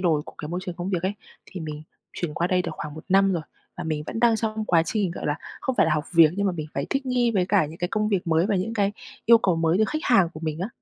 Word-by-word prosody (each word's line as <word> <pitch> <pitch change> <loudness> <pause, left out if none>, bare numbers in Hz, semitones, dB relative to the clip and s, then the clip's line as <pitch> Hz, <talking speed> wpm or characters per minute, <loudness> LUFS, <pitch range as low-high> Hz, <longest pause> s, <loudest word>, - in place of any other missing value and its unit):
đổi 160 -5 +2
của - - -12
cái 150 - -6
môi 175 +2 -3
trường 180 - -5
công 180 +2 -4
việc 180 -2 -1
ấy, 195 +2 -1 0.3
thì 185 - -8
mình 155 -1 -6 0.3
chuyển 160 -4 -4
qua 170 - 0
đây 180 0 +2
được - - -4
khoảng 150 0 -6
1 155 - -10
năm 195 0 +4
rồi, 165 -3 -1 0.3
và 175 - -5
mình 155 -2 -2
vẫn 225 - -4
đang 235 -2 +5
trong 220 -1 -2
quá 170 -5 +3
trình, 205 -5 0
gọi - - -5
là, 150 +1 0 0.2
không 260 - -1
phải - - +4
là 155 - +2
học 150 0 -1
việc, 165 -2 +7
nhưng 200 0 +1
mà 185 - +1
mình 155 -3 -5
phải 140 - -2
thích 270 -1 -1
nghi 245 -2 +2
với 185 -4 +1
cả 195 -6 +3
những 160 +3 -10
cái 175 - -1
công 215 0 0
việc 195 -4 0
mới 165 +3 +3
và 205 -3 +1
những 220 +5 -2
cái 200 -1 +1 0.3
yêu 230 0 +8
cầu 180 -6 +1
mới 165 +3 +2
từ 220 - +4
khách 310 +7 -3
hàng 195 -8 +4
của 155 - -8
mình 155 -1 -3
á. 195 - -2
180 Hz, 315 wpm, -25 LUFS, 160-210 Hz, 0.3 s, yêu